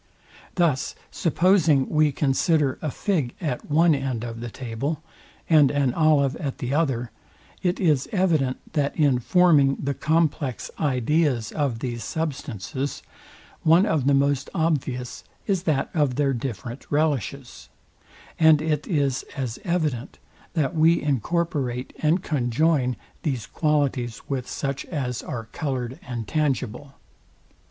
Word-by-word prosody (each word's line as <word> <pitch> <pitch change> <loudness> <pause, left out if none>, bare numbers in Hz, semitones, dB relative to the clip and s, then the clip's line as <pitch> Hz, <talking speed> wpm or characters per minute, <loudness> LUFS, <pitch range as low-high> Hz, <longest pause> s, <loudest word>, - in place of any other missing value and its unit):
Thus 155 -6 +1 0.2
supposing 165 -5 +3
we 155 -1 +3
consider 140 +1 +1
a 155 - -2
fig 150 -6 -1
at 150 -7 -4
one 160 +2 +5
end 135 -5 -2
of 115 -1 -6
the 120 0 -5
table, 135 +7 -4 0.4
and 150 -4 +6
an 140 -4 +1
olive 150 -4 +3
at 140 -5 -4
the 125 +2 -3
other, 130 -7 0 0.5
it 180 -1 0
is 150 -8 +2
evident, 160 -10 +1 0.2
that 145 -3 0
in 140 -6 +3
forming 150 -2 +4
the 140 0 -2
complex 155 -4 0
ideas 140 -2 +1
of 135 -7 -1
these 120 -3 -3
substances, 140 - -4 0.6
one 165 +5 +5
of 155 - +1
the 140 - +5
most 140 -1 +1
obvious 140 -7 -1 0.2
is 195 -4 0
that 135 -3 0
of 145 -6 +1
their 140 0 +1
different 120 0 -5
relishes; 140 -4 -1 0.7
and 160 -2 +6
it 155 -1 -1
is 140 -6 +1 0.2
as 125 -4 -3
evident, 155 - -1 0.4
that 155 -1 +1
we 165 +2 +4
incorporate 140 -2 -1
and 165 +4 +2
conjoin 130 -1 +1 0.3
these 130 -7 -2
qualities 140 -7 0
with 130 -3 -3
such 140 -1 -3
as 130 -7 -3
are 115 -3 -5
coloured 130 -4 -3
and 120 -3 -4
tangible. 140 -3 -2
140 Hz, 130 wpm, -24 LUFS, 125-155 Hz, 0.7 s, and